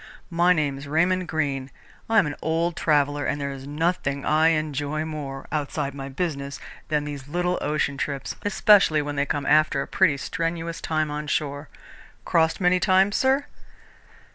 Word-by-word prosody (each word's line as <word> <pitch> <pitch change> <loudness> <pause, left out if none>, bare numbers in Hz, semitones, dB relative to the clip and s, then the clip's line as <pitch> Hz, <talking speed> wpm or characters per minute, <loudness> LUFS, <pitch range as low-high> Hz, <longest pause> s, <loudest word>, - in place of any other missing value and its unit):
"My 175 +1 +4
name's 145 -4 0
Raymond 175 +4 +1
Greene. 140 -4 -2 0.4
I 225 - +3
am 205 - +6
an 145 - -3
old 165 +2 0
traveller 145 -1 +1
and 145 - -1
there's 140 -1 -5
nothing 145 -2 -1
I 155 +1 +4
enjoy 155 -1 -1
more, 145 -4 -6
outside 145 -2 -2
my 135 -1 -6
business, 140 -2 -3 0.3
than 150 -1 0
these 145 -2 -7
little 180 +3 -1
ocean 145 -1 -1
trips, 140 -1 -3
especially 200 -6 +4
when 145 0 -4
they 140 0 0
come 145 -1 -2
after 150 -1 +3
a - - -10
pretty 165 -7 +3
strenuous 165 +3 -3
time 155 -1 -1
on 150 0 -4
shore. 145 0 -2 0.6
Crossed 160 -1 +2
many 180 0 +3
times, 190 +1 +3
sir?" 270 +2 +2
150 Hz, 160 wpm, -24 LUFS, 140-170 Hz, 0.6 s, am